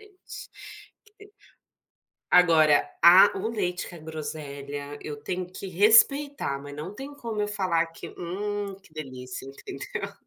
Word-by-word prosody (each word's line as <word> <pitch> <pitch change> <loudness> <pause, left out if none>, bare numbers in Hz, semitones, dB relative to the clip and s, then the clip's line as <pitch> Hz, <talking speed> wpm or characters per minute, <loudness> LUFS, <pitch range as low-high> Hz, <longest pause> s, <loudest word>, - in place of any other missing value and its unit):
deli 410 -2 -21 2.2
Agora, 160 -4 +5
a 180 +4 +9
o 215 +4 -2
leite 180 -6 -3
com 175 - -11
a - - -11
groselha, 145 -2 -7
eu 150 -1 -6
tenho 180 +3 -3
que 185 +2 -8
respeitar 225 - +4
mas 145 0 -9
não 160 +7 -7
tem 275 +2 -8
como 225 -5 -4
eu 210 - 0
falar 185 -5 0
que: 165 - -10
"Hum 200 +3 -4
que 155 - -21
delícia!" 130 -4 -7
Entendeu. 135 - -7
175 Hz, 135 wpm, -26 LUFS, 150-205 Hz, 2.2 s, a